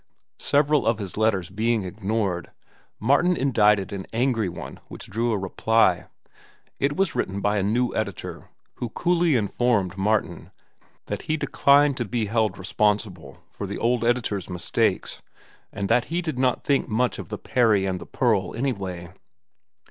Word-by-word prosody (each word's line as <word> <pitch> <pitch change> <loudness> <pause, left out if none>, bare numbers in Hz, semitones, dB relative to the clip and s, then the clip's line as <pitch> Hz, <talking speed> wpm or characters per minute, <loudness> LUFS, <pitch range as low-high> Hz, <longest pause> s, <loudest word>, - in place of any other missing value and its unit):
Several 145 -2 +2
of 115 -1 +3
his 100 -4 -6
letters 105 -5 +1
being 110 +2 0
ignored, 100 -1 -2 0.5
Martin 150 +9 +3
indicted 105 -7 +3
an 95 -1 -6
angry 115 -4 +1
one 85 - -8
which - - -8
drew 115 +3 -1
a 110 - +1
reply. 95 0 +2 0.7
It 145 +1 0
was 195 -3 +1
written 95 +1 -2
by 105 +1 +1
a - - +1
new 120 +5 0
editor, 100 -5 -4 0.3
who 120 - -4
coolly 170 +2 +2
informed 105 -4 0
Martin 105 +2 0 0.6
that - - -4
he 155 - +2
declined 140 -2 +3
to 120 - -1
be 110 +2 -1
held 110 -2 0
responsible 95 -6 -1
for 100 - -6
the 100 - -4
old 120 0 +1
editor's 115 -6 0
mistakes, 90 -1 -1 0.5
and 100 0 -3
that 120 +2 +3
he 175 +2 -2
did 155 -6 -3
not 130 -1 +1
think 140 -1 +1
much 120 +2 0
of - - -8
"The - - -4
Peri 110 -6 +2
and 95 -2 -2
the - - -9
Pearl" 110 -7 0
anyway. 95 -8 -3
110 Hz, 155 wpm, -24 LUFS, 100-125 Hz, 0.7 s, of